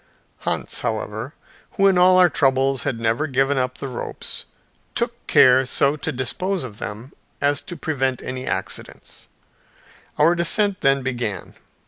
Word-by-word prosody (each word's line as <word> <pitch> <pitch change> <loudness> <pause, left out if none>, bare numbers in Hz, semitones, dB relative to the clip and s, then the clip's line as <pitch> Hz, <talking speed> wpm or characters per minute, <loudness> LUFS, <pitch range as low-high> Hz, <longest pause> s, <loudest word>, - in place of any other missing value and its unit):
Hans, - - -2
however, 110 +5 -4 0.4
who 195 - +2
in 195 -1 +5
all 185 +1 +6
our 180 -1 +7
troubles 135 -3 +2
had 115 - -2
never 115 +7 0
given 135 0 +1
up 125 0 -2
the 140 - -5
ropes, 125 -2 -6 0.5
took - - -3
care 130 +1 +6
so 140 +2 +1
to 155 +1 -3
dispose 175 +8 -2
of 110 -5 -9
them 110 +5 -7 0.3
as 145 0 +1
to 175 - -9
prevent 135 -5 -1
any 130 0 -5
accidents. - - -6 0.9
Our 160 +3 +5
descent 190 +3 +2
then 135 0 +2
began. 120 -6 -4
135 Hz, 145 wpm, -22 LUFS, 125-160 Hz, 0.9 s, our